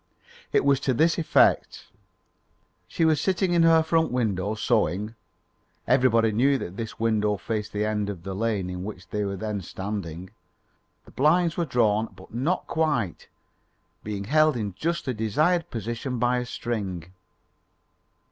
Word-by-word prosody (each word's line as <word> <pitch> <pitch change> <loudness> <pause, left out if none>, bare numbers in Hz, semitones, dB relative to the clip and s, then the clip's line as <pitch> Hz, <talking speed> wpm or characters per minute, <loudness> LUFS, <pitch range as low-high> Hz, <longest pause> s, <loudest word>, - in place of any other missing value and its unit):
It - - +2
was 140 -1 +4
to 135 -2 0
this 165 +6 +3
effect: 160 - +2 1.0
She 165 - 0
was 155 -2 +3
sitting 185 0 +1
in 170 - +4
her 165 -1 +5
front 160 0 +1
window 105 -4 -1
sewing. 110 -2 0 0.7
(Everybody 115 -4 +3
knew 135 +6 +3
that 95 -6 -6
this 115 +1 -6
window 105 -2 +1
faced 105 +1 -4
the 105 +1 -1
end 105 -1 -1
of 90 -5 -7
the 95 - -5
lane 105 -2 -1
in 90 0 -5
which 95 -3 -8
they 105 +2 -2
were 100 -1 -2
then 105 0 -3
standing.) 95 -2 -6 0.7
The - - -16
blinds 165 +4 +2
were 170 - 0
drawn 115 -5 +2
but 95 +2 -15
not 140 +10 -1
quite, 145 - -1 0.8
being 105 -2 -4
held 155 +4 +3
in 105 -4 -3
just 170 - -2
the 130 - -1
desired 155 - +1
position 120 +3 -4
by 125 +1 +1
a 125 - -5
string. 95 -9 -4
115 Hz, 155 wpm, -25 LUFS, 105-145 Hz, 1.0 s, her